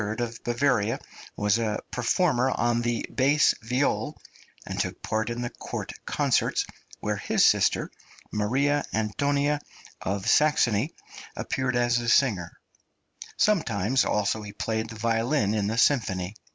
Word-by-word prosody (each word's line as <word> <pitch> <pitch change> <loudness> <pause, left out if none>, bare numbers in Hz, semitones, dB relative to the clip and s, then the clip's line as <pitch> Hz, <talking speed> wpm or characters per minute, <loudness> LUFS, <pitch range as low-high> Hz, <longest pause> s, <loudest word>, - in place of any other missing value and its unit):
of 120 0 -4
Bavaria 120 -3 +1 0.4
was 105 +2 +2
a 110 -2 0
performer 130 +1 +2
on 120 -2 +1
the 120 -1 -1
bass 140 +3 +4
viol, 125 +5 -1 0.5
and - - -5
took - - -3
part 110 +1 -1
in 120 +1 -3
the 120 - -4
court - - -6
concerts, - - +1 0.4
where - - -1
his - - +2
sister, - - +3 0.4
Maria 135 +8 +1
Antonia 140 +7 0 0.4
of 100 +2 -3
Saxony, 145 -3 +3 0.4
appeared 130 -2 -2
as 120 0 +2
a 120 0 -2
singer; 105 -10 +2 0.9
sometimes 130 - +2
also 105 +1 0
he 105 -1 -8
played 110 +1 -2
the 115 - -8
violin 115 +1 +1
in 105 -2 0
the 115 +2 -2
symphony. 100 -8 +2
120 Hz, 130 wpm, -26 LUFS, 105-135 Hz, 0.9 s, bass